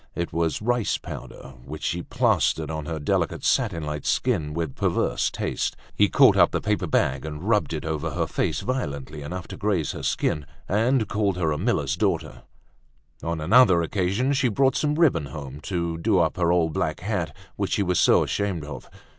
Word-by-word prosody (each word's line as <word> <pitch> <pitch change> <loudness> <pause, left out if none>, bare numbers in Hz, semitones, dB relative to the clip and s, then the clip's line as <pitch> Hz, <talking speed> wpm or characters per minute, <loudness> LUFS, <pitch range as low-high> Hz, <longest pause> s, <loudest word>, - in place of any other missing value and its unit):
It 85 -1 -3
was 85 +4 -1
rice 120 -1 +1
powder, 65 - -9
which 75 +4 -8
she 85 - -1
plastered 80 -2 +1
on 80 -1 -5
her 80 -1 -3
delicate 75 - -1
satin 80 - +1
like 75 -1 -4
skin 95 -13 0
with 80 -5 -3
perverse - - 0
taste. - - -2 0.2
He - - +4
caught - - +6
up - - +6
the - - -1
paper 105 -3 -1
bag 65 -3 +1
and 75 +1 -6
rubbed 105 -5 +2
it 80 -2 -4
over 80 0 -2
her - - -1
face - - -1
violently 75 - -4
enough 85 +5 -6
to - - -7
graze 95 -8 0
her - - -7
skin 75 -2 -1 0.2
and 115 +3 +2
called 100 -2 0
her 80 -3 +1
a 75 - -2
miller's 80 - 0
daughter. 85 -5 -1 0.8
On 85 -1 -3
another 95 0 +5
occasion 100 - 0
she 130 -2 +2
brought 130 +4 +2
some 150 +1 +1
ribbon 130 - +3
home, 70 -1 -8
to 85 -3 -2
do 105 +2 +2
up 85 -3 +2
her 85 -1 +2
old 85 -3 +2
black 80 +1 -2
hat 90 -6 -3 0.2
which - - -2
she 100 - +2
was 90 -2 +1
so - - +5
ashamed 95 -7 -2
of. 75 - -9
85 Hz, 190 wpm, -25 LUFS, 75-105 Hz, 0.8 s, caught